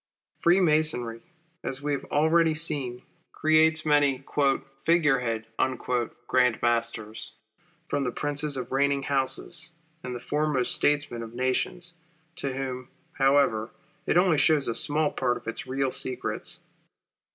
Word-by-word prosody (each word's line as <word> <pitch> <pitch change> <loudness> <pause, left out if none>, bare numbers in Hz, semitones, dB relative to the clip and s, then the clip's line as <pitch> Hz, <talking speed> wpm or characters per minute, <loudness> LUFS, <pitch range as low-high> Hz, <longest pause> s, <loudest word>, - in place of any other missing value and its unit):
Freemasonry, 155 -10 +2 0.4
as 135 +1 -2
we 150 - -1
have 140 - -3
already 160 +1 +3
seen, 140 -6 -2 0.3
creates 160 0 +3
many 145 -3 +3 0.6
"figure 155 -5 +3
head" 115 -2 -2 0.8
Grand 125 -3 +3
Masters, 115 -2 -1 0.5
from 140 - -1
the 125 - -1
princes 145 +1 -1
of 125 -2 -5
reigning 140 +1 +1
houses, 140 +5 -1 0.3
and 125 -1 -5
the - - -5
foremost 150 -2 0
statesmen 145 -5 +1
of 115 0 -8
nations, 130 +7 -1 0.4
to 140 - -3
whom, 130 -1 -5 0.2
however, 135 -5 +2 0.4
it - - +3
only 180 -4 +4
shows 150 -2 +3
a 115 - 0
small 150 +4 +2
part 125 -2 0
of - - -14
its 115 - -4
real 135 0 -1
secrets. 130 0 -2
140 Hz, 130 wpm, -27 LUFS, 125-155 Hz, 0.8 s, only